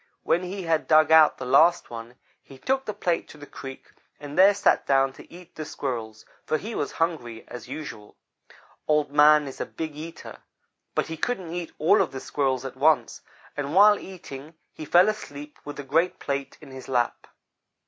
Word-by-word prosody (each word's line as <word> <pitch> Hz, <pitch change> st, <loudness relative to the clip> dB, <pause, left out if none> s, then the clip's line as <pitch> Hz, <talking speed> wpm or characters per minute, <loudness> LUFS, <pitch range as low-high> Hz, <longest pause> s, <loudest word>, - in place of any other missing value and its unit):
When 170 Hz, -, +2 dB
he 185 Hz, +1 st, -5 dB
had 165 Hz, -2 st, 0 dB
dug 155 Hz, 0 st, +5 dB
out 160 Hz, -1 st, +7 dB
the 130 Hz, -, -6 dB
last 155 Hz, +6 st, +4 dB
one, 115 Hz, +1 st, -8 dB, 0.3 s
he 135 Hz, -, -15 dB
took 265 Hz, -, -1 dB
the 210 Hz, -, -3 dB
plate 175 Hz, -2 st, -1 dB
to -, -, -13 dB
the 145 Hz, -, -11 dB
creek 135 Hz, -2 st, -10 dB, 0.3 s
and 145 Hz, 0 st, -8 dB
there 195 Hz, +2 st, +6 dB
sat 200 Hz, -, +2 dB
down 135 Hz, -1 st, +3 dB
to -, -, -15 dB
eat 175 Hz, 0 st, -14 dB
the 155 Hz, -, -6 dB
Squirrels, 115 Hz, -7 st, -5 dB, 0.2 s
for 155 Hz, -, 0 dB
he 220 Hz, +8 st, -7 dB
was 145 Hz, -, -3 dB
hungry, 135 Hz, -9 st, -3 dB
as 125 Hz, -, -9 dB
usual. 110 Hz, -9 st, -8 dB, 0.7 s
Old 150 Hz, -2 st, +2 dB
man 150 Hz, 0 st, +6 dB
is 135 Hz, -, -7 dB
a -, -, -1 dB
big 160 Hz, -2 st, -6 dB
eater, 160 Hz, +2 st, -9 dB, 0.6 s
but -, -, +1 dB
he 160 Hz, -, -6 dB
couldn't 185 Hz, -5 st, -3 dB
eat 175 Hz, -2 st, -5 dB
all 190 Hz, +7 st, +4 dB
of 180 Hz, -, -2 dB
the 135 Hz, -, -5 dB
Squirrels 135 Hz, -2 st, -1 dB
at 135 Hz, -, -6 dB
once, 140 Hz, -4 st, +2 dB, 0.3 s
and 145 Hz, +2 st, -4 dB
while 205 Hz, +1 st, +7 dB
eating 155 Hz, -5 st, -10 dB, 0.2 s
he 155 Hz, -, -8 dB
fell 175 Hz, +6 st, +5 dB
asleep 150 Hz, -9 st, -5 dB
with 145 Hz, 0 st, -7 dB
the 145 Hz, -, -7 dB
great 165 Hz, +6 st, +1 dB
plate 140 Hz, -1 st, -4 dB
in 145 Hz, -3 st, -13 dB
his 130 Hz, -1 st, -10 dB
lap. 120 Hz, -2 st, -1 dB
150 Hz, 195 wpm, -25 LUFS, 135-170 Hz, 0.7 s, out